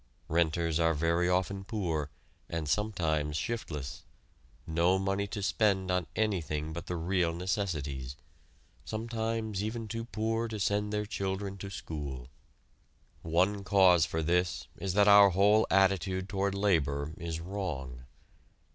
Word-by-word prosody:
"Renters" 80 Hz, 0 st, +1 dB
are 80 Hz, -1 st, +3 dB
very 85 Hz, +3 st, +1 dB
often 95 Hz, +2 st, +1 dB
very 95 Hz, -, -9 dB
poor, 85 Hz, -9 st, -2 dB, 0.4 s
and 85 Hz, -2 st, -3 dB
sometimes 80 Hz, -7 st, 0 dB
shiftless 80 Hz, -, -4 dB, 0.6 s
no 85 Hz, +4 st, +2 dB
money 95 Hz, +1 st, -1 dB
to 100 Hz, 0 st, -5 dB
spend 95 Hz, -3 st, +1 dB
on 90 Hz, -2 st, 0 dB
anything 80 Hz, -8 st, -1 dB
but 85 Hz, -, -7 dB
the 90 Hz, -, -2 dB
real 85 Hz, 0 st, +1 dB
necessities; 75 Hz, -9 st, -3 dB, 0.7 s
sometimes 110 Hz, -2 st, -3 dB
even 110 Hz, +1 st, -3 dB
too 115 Hz, +2 st, -4 dB
poor 115 Hz, +1 st, -1 dB
to 110 Hz, -2 st, -5 dB
send 105 Hz, +1 st, 0 dB
their 105 Hz, 0 st, -1 dB
children 100 Hz, -1 st, -3 dB
to 100 Hz, -, -6 dB
school. 70 Hz, -7 st, -6 dB, 0.9 s
One 95 Hz, +5 st, +1 dB
cause 95 Hz, -4 st, +5 dB
for 80 Hz, 0 st, -2 dB
this 90 Hz, +2 st, +1 dB
is 95 Hz, -2 st, -3 dB
that 100 Hz, 0 st, +5 dB
our 100 Hz, -1 st, +9 dB
whole 100 Hz, +4 st, +4 dB
attitude 95 Hz, -1 st, +2 dB
toward 100 Hz, -1 st, -1 dB
labor 80 Hz, -7 st, +1 dB
is 80 Hz, -1 st, -4 dB
wrong. 80 Hz, -10 st, -5 dB
95 Hz, 135 wpm, -30 LUFS, 80-100 Hz, 0.9 s, our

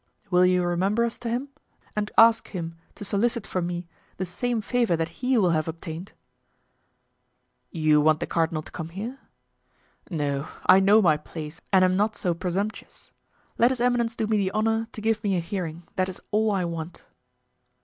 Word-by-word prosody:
"Will 180 Hz, 0 st, +5 dB
you 180 Hz, 0 st, +3 dB
remember 195 Hz, +6 st, +1 dB
us 230 Hz, -, -4 dB
to 240 Hz, -, -4 dB
him 250 Hz, +5 st, -2 dB, 0.5 s
and 210 Hz, 0 st, -1 dB
ask 225 Hz, 0 st, +6 dB
him 165 Hz, -4 st, -5 dB, 0.2 s
to 205 Hz, -, -7 dB
solicit 225 Hz, +3 st, 0 dB
for 185 Hz, -, -2 dB
me 175 Hz, 0 st, -4 dB, 0.3 s
the 185 Hz, -, -2 dB
same 235 Hz, +6 st, -2 dB
favor 230 Hz, -4 st, +1 dB
that 165 Hz, +4 st, -4 dB
he 255 Hz, 0 st, +2 dB
will 185 Hz, -6 st, +3 dB
have 155 Hz, -1 st, 0 dB
obtained?" 165 Hz, +2 st, -7 dB, 1.6 s
"You 155 Hz, -3 st, +3 dB
want 155 Hz, +1 st, +4 dB
the -, -, -2 dB
cardinal 160 Hz, -2 st, 0 dB
to -, -, -13 dB
come 160 Hz, 0 st, -6 dB
here?" 220 Hz, +10 st, -6 dB, 0.9 s
"No; 145 Hz, -4 st, -2 dB, 0.2 s
I 185 Hz, +1 st, +7 dB
know 205 Hz, +3 st, +5 dB
my 155 Hz, -4 st, +4 dB
place 155 Hz, +2 st, -8 dB
and 190 Hz, -2 st, +6 dB
am 185 Hz, 0 st, +2 dB
not 210 Hz, +2 st, +1 dB
so 180 Hz, -3 st, 0 dB
presumptuous. 185 Hz, +5 st, -4 dB, 0.5 s
Let 235 Hz, -, +6 dB
his 260 Hz, -2 st, -2 dB
eminence 240 Hz, -1 st, +1 dB
do 220 Hz, -, -1 dB
me 215 Hz, 0 st, +1 dB
the 195 Hz, -2 st, +1 dB
honor 225 Hz, +2 st, 0 dB
to 215 Hz, -, -8 dB
give 220 Hz, 0 st, 0 dB
me 195 Hz, -3 st, +1 dB
a -, -, +1 dB
hearing; 170 Hz, -2 st, -4 dB
that 185 Hz, 0 st, +1 dB
is 185 Hz, -, -8 dB
all 215 Hz, +1 st, +2 dB
I 190 Hz, -3 st, 0 dB
want." 170 Hz, 0 st, -6 dB
190 Hz, 185 wpm, -25 LUFS, 170-220 Hz, 1.6 s, I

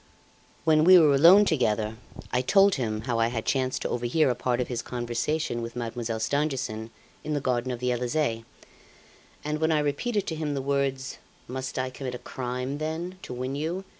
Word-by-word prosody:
"When 155 Hz, -1 st, +4 dB
we 185 Hz, +2 st, +9 dB
were 155 Hz, -4 st, +6 dB
alone 175 Hz, +9 st, +7 dB
together, 110 Hz, -, 0 dB, 0.4 s
I 125 Hz, -, +2 dB
told 195 Hz, +8 st, +5 dB
him 110 Hz, -7 st, -2 dB
how 115 Hz, 0 st, -1 dB
I 115 Hz, -, +3 dB
had 115 Hz, -2 st, -3 dB
chanced 130 Hz, -1 st, 0 dB
to -, -, -2 dB
overhear 125 Hz, +4 st, +1 dB
a -, -, +1 dB
part 120 Hz, 0 st, -1 dB
of 125 Hz, -, -1 dB
his 120 Hz, -2 st, -3 dB
conversation 120 Hz, +2 st, -2 dB
with 115 Hz, +1 st, -6 dB
Mademoiselle 115 Hz, -1 st, -3 dB
Stangerson 130 Hz, -4 st, -1 dB, 0.3 s
in 155 Hz, 0 st, -2 dB
the -, -, +1 dB
garden 130 Hz, -2 st, -1 dB
of 125 Hz, -, -3 dB
the 125 Hz, 0 st, 0 dB
Elysee; 120 Hz, -1 st, -1 dB, 1.0 s
and 150 Hz, +1 st, -2 dB
when 160 Hz, 0 st, +2 dB
I 155 Hz, -, +3 dB
repeated 150 Hz, +10 st, -1 dB
to 160 Hz, -, -3 dB
him 155 Hz, -2 st, -2 dB
the 135 Hz, -, -2 dB
words, 135 Hz, -1 st, -1 dB, 0.3 s
'Must 130 Hz, +1 st, -5 dB
I 130 Hz, 0 st, -1 dB
commit 130 Hz, -1 st, -5 dB
a -, -, -4 dB
crime, 125 Hz, +3 st, -4 dB
then, 165 Hz, +4 st, -4 dB
to -, -, -9 dB
win 130 Hz, +2 st, -3 dB
you? 165 Hz, +6 st, -3 dB
130 Hz, 195 wpm, -27 LUFS, 120-155 Hz, 1.0 s, we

